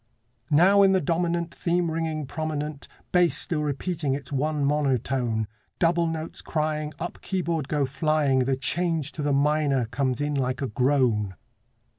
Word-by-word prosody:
Now 185 +7 +5
in 195 -1 +6
the 190 - +4
dominant 170 +1 -1
Theme 175 -1 0
ringing 160 -2 -2
prominent, 150 0 -4 0.2
Bass 180 -2 +3
still 155 -3 -1
repeating 150 0 -1
its 140 +1 -8
one 145 +1 0
monotone, 130 -6 0 0.3
Double 170 0 +2
notes 160 0 -4
crying, 155 -1 -2
Up 175 - -6
keyboard 170 -6 -2
go 145 -2 +1
flying, 145 -1 +1
The 130 +1 +1
change 160 +1 0
to 155 - -6
the 145 0 0
minor 140 -2 +2
comes 130 +1 -1
in 145 0 -1
like 130 -3 -1
a 135 - -1
groan. 120 -5 +1
150 Hz, 150 wpm, -26 LUFS, 135-165 Hz, 0.3 s, in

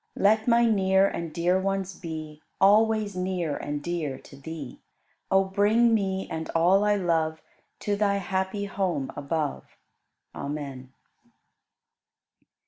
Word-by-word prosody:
Let 215 +3 +3
my 235 0 +5
near 195 -3 +3
and 170 -4 -4
dear 175 +3 +1
ones 195 0 -2
be 155 -3 -7 0.2
Always 210 0 +4
near 180 -4 -2
and 145 0 -4
dear 160 -6 -3
to 140 - -15
Thee. 145 -1 -8 0.5
O 190 0 +4
bring 210 +5 +3
me 190 -3 0
and 160 0 -5
all 180 +5 +4
I 210 0 +3
love 160 -4 0 0.4
To 205 - 0
Thy 200 -1 +1
happy 190 +1 -2
home 185 -9 -2
above. 145 0 -3 0.6
Amen. 140 -3 -6
190 Hz, 125 wpm, -26 LUFS, 160-200 Hz, 0.6 s, my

